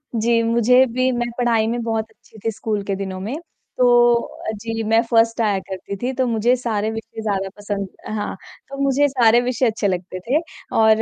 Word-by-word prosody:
जी, 230 +1 +2
मुझे 235 +3 +4
भी 255 +2 +1
मैं 240 -1 -1
पढ़ाई 230 -3 +2
में 235 +1 -1
बहुत 225 -1 -2
अच्छी 220 - -20
थी 225 - 0
स्कूल 210 -1 -3
के 195 -1 -2
दिनों 190 -1 -5
में। 215 +9 -4 0.4
तो 250 -1 +4 0.3
अ, 235 -1 -3
जी, 225 -1 -3
मैं 225 +1 +3
फर्स्ट 230 0 +3
आया 205 -3 +2
करती 190 +1 -5
थी 255 +2 -1
तो 260 0 0
मुझे 235 +2 +2
सारे 220 -4 -1
विषय 225 0 -7
ज़्यादा 195 -3 -1
पसंद 205 -1 -3 0.2
अ, - - -5
हाँ, 215 -2 -3 0.3
तो 275 - -7
मुझे 275 +1 +3
सारे 240 -3 +4
विषय 250 +1 0
अच्छे 215 -2 0
लगते 185 0 -3
थे। 250 +11 +1 0.4
और 220 0 +5
225 Hz, 200 wpm, -21 LUFS, 210-240 Hz, 0.4 s, और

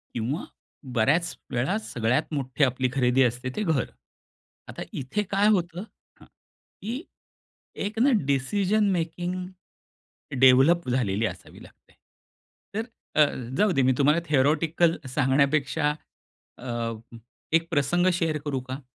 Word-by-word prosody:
किंवा 120 +7 -2 0.5
बऱ्याच 150 +10 +2 0.2
वेळा 130 - 0
सगळ्यात 125 - -1
मोठी 135 +1 +1
आपली 130 0 0
खरेदी 130 0 +3
असते 125 +1 0
ते 215 - -1
घर. 160 - +1 0.8
आता - - -7
इथे 140 +11 -2
काय 200 +2 +3
होतं? 180 -3 0 0.4
हां. - - -16
की 240 - -10 0.8
एक 215 +2 -5
ना 280 - +5 0.2
डिसिजन 200 +10 +1
मेकिंग 175 +1 -2 1.1
डेवलप 135 +5 +5
झालेली 115 -4 0
असावी - - -7
लागते. - - -20 0.8
तर 220 +2 -1 0.3
अ, 155 - +5 0.4
जाऊ 210 -1 +3
दे - - +5
मी 130 - +4
तुम्हाला 150 +4 +3
थेरोटिकल 155 +4 +2 0.2
सांगण्यापेक्षा 145 +2 +2 0.6
अ, 120 -2 -3 0.6
एक 165 0 +3
प्रसंग 170 +5 +2
शेअर 165 -3 0
करू 135 -3 -1
का? 135 +2 -5
150 Hz, 120 wpm, -26 LUFS, 130-175 Hz, 1.1 s, ना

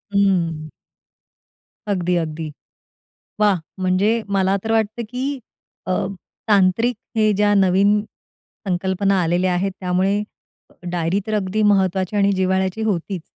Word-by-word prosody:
हम्म. 170 -6 +1 1.2
अगदी, 180 -3 0
अगदी. 160 -1 -3 0.9
वाह! 205 -4 +4 0.2
म्हणजे 200 +5 +2
मला 195 0 +2
तर 225 - -1
वाटतं, 220 +1 0
की 270 +3 -3 0.5
अ, - - +1 0.6
तांत्रिक 205 +4 +3 0.2
हे 215 -1 +3
ज्या 205 +1 +2
नवीन 195 +2 +4 0.7
संकल्पना 190 +2 +1
आलेल्या 175 +2 +1
आहेत 190 +2 0
त्यामुळे, 190 +3 +1 0.7
डायरी 175 +3 0
तर 215 - -2
अगदी 210 +1 0
महत्वाची 190 -1 +2
आणि 200 0 +3
जिव्हाळ्याची 190 +2 0
होतीच. 190 -4 -2
195 Hz, 110 wpm, -21 LUFS, 180-210 Hz, 1.2 s, वाह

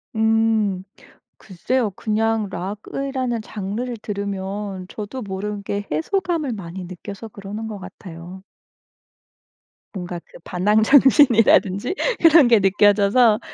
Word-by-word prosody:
음. 220 -3 +1 0.5
글쎄요. 220 +3 -2
그냥 220 +1 -1
록이라는 235 +6 -4
장르를 220 +4 -5
들으면 200 -1 -5
저도 215 +5 -7
모르게 200 0 -4
해소감을 310 - -1
많이 185 -2 -7
느껴서 200 +5 -9
그러는 210 +2 -7
것 210 -2 -6
같아요. 185 -1 -11 1.5
뭔가 175 -2 -5
그 - - -16
반항 210 +4 +1
정신이라든지 245 - +4 0.3
그런 325 -5 +7
게 230 -3 +5
느껴져서. 205 +3 +4
210 Hz, 245 characters per minute, -21 LUFS, 190-230 Hz, 1.5 s, 그런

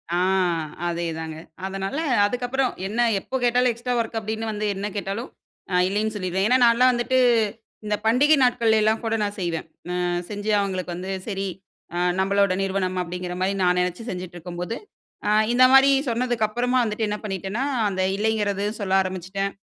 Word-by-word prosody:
ஆ, - - +1 0.7
அதே 170 0 -2
தாங்க. 160 -1 -6 0.3
அதனால 195 +6 -3 0.3
அதுக்கப்புறம் 245 +3 0 0.2
என்ன 215 +4 -4 0.2
எப்போ 260 - -7
கேட்டாலும் 245 +1 +3
எக்ஸ்ட்ரா 240 +2 -3
வொர்க் 230 -1 -2
அப்பிடின்னு 220 +1 -4
வந்து 215 0 -3
என்ன 200 +2 -3
கேட்டாலும் 200 +5 -4 0.4
இ, - - -3
இல்லேன்னு 210 +3 -1
சொல்லிருவேன். 190 -1 -1
ஏன்னா 250 +3 +5
நான்லாம் 240 +2 +5
வந்துட்டு 245 +1 0 0.7
இந்த 210 0 +1
பண்டிகை 270 +7 +5
நாட்கள்ல 235 -3 +3
எல்லாம் 220 +1 +2
கூட 225 0 +1
நான் 205 0 -2
செய்வேன். 170 -3 -2 0.3
ஆ, - - -1 0.3
செஞ்சு 210 0 -3
அவுங்களுக்கு 185 -3 -3
வந்து 185 +2 -5 0.2
சரி 195 -2 -2 0.5
அ - - -2 0.2
நம்மளோட 200 0 +2
நிறுவனம். 190 -1 -1
அப்பிடிங்கிற 180 0 -5
மாரி 190 +1 +2
நான் 180 0 +3
நினைச்சு 180 +4 -1
செஞ்சுட்டு 180 -4 -6
இருக்கும்போது, 175 +4 -5 0.5
ஆ, - - +2 0.2
இந்த 255 +1 +7
மாதிரி 270 +1 +7 0.2
சொன்னதுக்கு 240 -1 0
அப்பறமா 245 +4 0
வந்துட்டு 220 0 -1
என்ன 210 0 -2
பண்ணிட்டேன்னா, 195 +3 -3 0.3
அந்த 190 -1 -2
இல்லைங்கிறது 205 -1 0 0.2
சொல்ல 195 -2 -2
ஆரம்பிச்சுட்டேன். 190 +1 -3
205 Hz, 160 wpm, -24 LUFS, 190-235 Hz, 0.7 s, இந்த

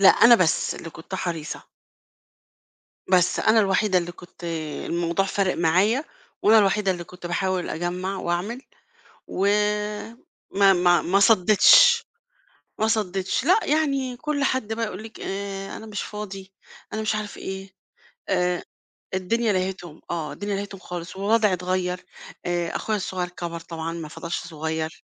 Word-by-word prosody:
لأ، 195 - +8
أنا 235 +4 +8
بس 180 -8 +2
اللي 165 - -8
كنت 165 +5 -9
حريصة. 170 -4 -4 1.5
بس 180 -1 +3
أنا 220 +1 +4
الوحيدة 195 -1 +2
اللي 175 0 -2
كنت 175 0 -16 0.4
الموضوع 170 +3 0
فارق 195 -1 0
معايا 190 - +2 0.4
وأنا 220 +1 +6
الوحيدة 195 -1 +2
اللي 175 -1 -4
كنت 180 0 -12
باحاول 185 0 -1
أجمّع 180 +3 -3
وأعمل. 190 +10 -2 0.7
و 195 +2 -1 1.0
ما 195 -1 +5
ما 175 -1 +4
ما 195 +3 +2
صدِّتش، 205 -1 +6 0.7
ما 220 - +2
صدِّتش. 195 -3 0
لأ، 370 +8 +5
يعني 275 -5 0
كل 295 +1 -1
حد 260 -5 0
بقى 225 0 -1
يقول 205 +1 -7
لِك: 225 0 -11
"آآ 195 0 -5
أنا 220 - -9
مش 210 -2 -4
فاضي،" 195 -2 -7 0.4
أنا 220 0 -2
مش 215 - 0
عارف 215 -1 -4
إيه. 190 0 -6 0.6
آآ 180 -2 +1 0.5
الدنيا 215 +4 +1
لهِتهم 185 -4 -3
،آه، 160 -4 -3
الدنيا 205 +7 -3
لهِتهم 200 -1 -6
خالص، 175 +1 -7
ووضعي 210 +1 +3
اتغيّر، 180 0 -1 0.4
آآ 175 -1 -1
أخويا 215 -1 -1
الصغير 180 -2 -3
كَبَر 170 -1 -6
طبعًا 165 0 -5
ما 165 -2 -6
فضلش 170 +2 -4
صغير. 160 0 -4
190 Hz, 145 wpm, -24 LUFS, 175-210 Hz, 1.5 s, لأ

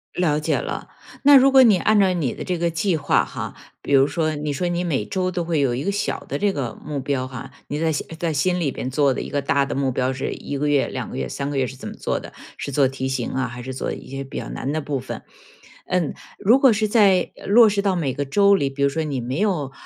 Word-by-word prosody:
了 155 -4 +1
解 150 - 0
了， - - -5 0.3
那 285 0 +8
如 270 +1 +5
果 265 -1 +8
你 215 -6 +6
按 210 +4 +3
照 190 -2 +4
你 155 -9 -1
的 - - -6
这 180 -2 -2
个 170 0 0
计 170 +2 0
划 145 - +2
哈。 - - -6 0.3
比 - - -6
如 135 0 +6
说 155 +1 -1
你 150 0 -3
说 175 +5 -1
你 175 0 -1
每 140 -10 0
周 185 - -1
都 175 -1 -2
会 165 -2 0
有 130 -4 +1
一 130 - -3
个 200 - 0
小 200 - -2
的 - - -3
这 205 -1 +1
个 125 -8 -3
目 145 -2 -3
标 130 -1 -2
哈， 130 -2 -8 0.2
你 145 - -3
在 160 - +2 0.3
在 165 0 -1
心 180 +5 +1
里 145 -5 0
边 130 - -4
做 140 0 +2
的 - - -4
一 - - -6
个 145 - -1
大 140 0 +1
的 140 - -4
目 135 -1 0
标 130 +1 0
是 130 - -3
1 145 - -5
个 150 +2 0
月、 145 -2 +2
2 - - -5
个 - - -6
月、 65 - -2
3 140 - -4
个 145 - -3
月、 130 -1 +1
是 130 - -8
怎 130 - -8
么 - - -8
做 - - -2
的， - - -10 0.3
是 140 - -5
做 135 -1 +3
题 130 0 -4
型 130 -2 -2
啊？ 130 0 -1
还 120 0 -8
是 130 +2 -6
做 130 - -3
一 - - -8
些 135 +1 -5
比 135 - -8
较 - - -6
难 135 - -4
的 155 - -1
部 145 -3 -3
分？ 130 - -7 0.6
嗯， 180 -5 0 0.3
如 235 +7 +5
果 270 -2 +6
是 215 0 +1
在 200 -4 +4
落 225 +3 +7
实 200 -1 +1
到 195 -2 +1
每 140 -6 -1
个 145 - -2
周 200 +8 +4
里， 140 -8 0
比 135 +1 -7
如 140 - +5
说 160 +3 -2
你 145 -4 -3
没 125 +4 -3
有 170 -10 0
145 Hz, 290 characters per minute, -22 LUFS, 135-185 Hz, 0.6 s, 那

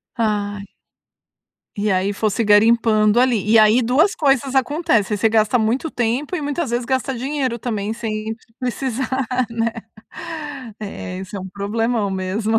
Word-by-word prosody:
Ai. 205 -3 -1 1.1
E 210 0 0
aí 190 +1 +1
fosse 215 +2 0
garimpando 215 +1 +4
ali. 240 -5 +2
E 225 - +6
aí 215 +3 +5
duas 295 - +3
coisas 275 - +1
acontecem: 255 - +1
Você 220 +2 +2
gasta 220 +1 +3
muito 235 +8 0
tempo 245 +8 -1
e 355 - -3
muitas 290 -1 -2
vezes 240 0 -1
gasta 260 +1 -1
dinheiro 260 -1 -2
também 215 -3 -2
sem 220 -1 -4 0.2
precisar, 255 0 -2 0.4
né? 230 0 -1 1.1
É, 195 -3 -6
esse 190 +2 -7
é - - -4
um 190 - -7
problemão 210 +2 -1
mesmo. 200 +4 0
225 Hz, 145 wpm, -20 LUFS, 210-255 Hz, 1.1 s, E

